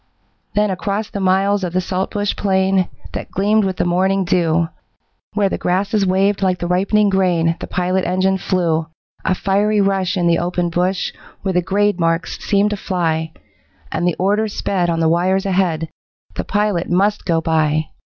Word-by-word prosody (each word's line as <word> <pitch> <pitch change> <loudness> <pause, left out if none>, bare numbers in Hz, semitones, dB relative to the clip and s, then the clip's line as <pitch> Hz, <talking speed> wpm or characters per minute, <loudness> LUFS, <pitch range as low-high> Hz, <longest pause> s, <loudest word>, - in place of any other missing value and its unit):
Then 210 -1 +2
across 200 +3 -3
the 200 - -4
miles 195 +1 +2
of 175 -2 -3
the 185 - +2
saltbush 190 +3 -2
plain 190 -1 +1 0.2
That - - -5
gleamed 210 +3 +2
with 190 -1 -2
the - - 0
morning 190 +2 +1
dew, 170 -1 +2 0.7
Where 205 -2 +3
the - - -3
grasses 195 +3 0
waved 195 +2 +2
like 185 -2 +1
the 175 - -4
ripening 200 +4 +2
grain 175 -4 +2
The - - -6
pilot 180 +1 0
engine 185 +2 +1
flew, 165 -4 0 0.4
A 185 - +1
fiery 205 +3 +1
rush 195 -2 +1
in 175 - +1
the 170 -1 +3
open 175 0 -1
bush 180 +2 0 0.3
Where 190 -1 -1
the 180 - +2
grade 200 +3 +1
marks 165 +1 0
seemed 205 +1 +2
to 210 - -2
fly, 160 -4 -1 0.6
And 175 - 0
the 175 - +1
order 205 +4 +1
sped 190 -3 -1
on 165 -1 0
the 160 - +3
wires 185 +4 +1
ahead, 180 -4 0 0.5
The - - -4
pilot 205 -4 0
MUST 200 +4 +1
go 165 -3 +1
by. 155 -1 +1
185 Hz, 175 wpm, -19 LUFS, 175-200 Hz, 0.7 s, Where